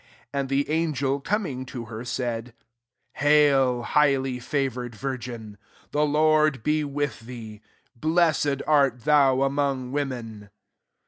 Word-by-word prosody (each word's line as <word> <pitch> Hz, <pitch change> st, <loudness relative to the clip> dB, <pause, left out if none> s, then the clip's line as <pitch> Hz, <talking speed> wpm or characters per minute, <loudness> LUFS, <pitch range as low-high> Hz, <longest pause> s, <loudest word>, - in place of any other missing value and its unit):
38 140 Hz, -, -1 dB
And 135 Hz, -1 st, -2 dB
the 145 Hz, +4 st, +1 dB
an* 155 Hz, -, -2 dB
gel 135 Hz, +1 st, 0 dB
coming 150 Hz, -6 st, -2 dB
to 120 Hz, -2 st, -6 dB
her, 110 Hz, 0 st, -8 dB
saidj 120 Hz, -1 st, -4 dB, 0.3 s
<< -, -, -31 dB
Haily 135 Hz, -4 st, +4 dB
highly 135 Hz, -3 st, +2 dB
favoured 125 Hz, -2 st, -2 dB
wiv^n: 120 Hz, -4 st, -6 dB, 0.3 s
the 150 Hz, +1 st, +2 dB
Lord 155 Hz, -3 st, +3 dB
be 155 Hz, +2 st, +1 dB
with 145 Hz, 0 st, -3 dB
thee: 115 Hz, -3 st, -10 dB, 0.3 s
[blessed 155 Hz, 0 st, +1 dB
art 140 Hz, -5 st, +3 dB
thou 135 Hz, -1 st, +4 dB
among 135 Hz, -2 st, -1 dB
women. 120 Hz, -7 st, -4 dB
135 Hz, 130 wpm, -25 LUFS, 125-145 Hz, 0.3 s, Haily